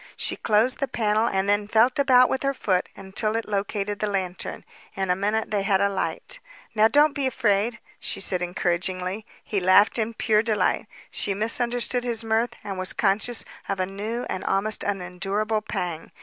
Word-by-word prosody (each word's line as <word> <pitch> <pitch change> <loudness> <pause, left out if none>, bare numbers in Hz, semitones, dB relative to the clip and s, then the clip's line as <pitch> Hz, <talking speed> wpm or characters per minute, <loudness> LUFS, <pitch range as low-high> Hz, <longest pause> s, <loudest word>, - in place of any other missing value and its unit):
She - - -2
closed 225 +4 +1
the 275 - 0
panel 220 -2 +1
and 195 -3 0
then 205 0 +2
felt 230 +5 +3
about 255 -2 +6
with 265 - -2
her 275 0 0
foot 185 -7 0
until 200 +3 -3
it 225 - -2
located 205 0 -2
the 210 - 0
lantern. 190 -3 -4 0.3
In 190 -2 0
a - - +3
minute 210 +4 -1
they 205 -2 +1
had 195 -1 +2
a 200 0 +3
light. 350 - -4 0.3
"Now, 215 -1 +5
don't 290 +5 +4
be 280 -2 0
afraid," 225 -2 +1 0.2
she - - -1
said 185 -2 +2
encouragingly. 185 +3 -1 0.2
He 205 - -1
laughed 185 +5 +5
in 225 +1 -1
pure 215 -1 +2
delight; 215 -4 0 0.2
she 200 - +1
misunderstood 240 +3 0
his 235 -2 -1
mirth 225 +2 0
and 195 -2 -5
was 185 - -2
conscious 215 +3 +1 0.2
of 195 -1 -1
a 185 - +1
new 210 +5 -4
and 185 - -3
an - - -2
almost 200 +3 0
unendurable 200 +3 -2
pang. 175 -6 -4
210 Hz, 185 wpm, -24 LUFS, 195-230 Hz, 0.3 s, about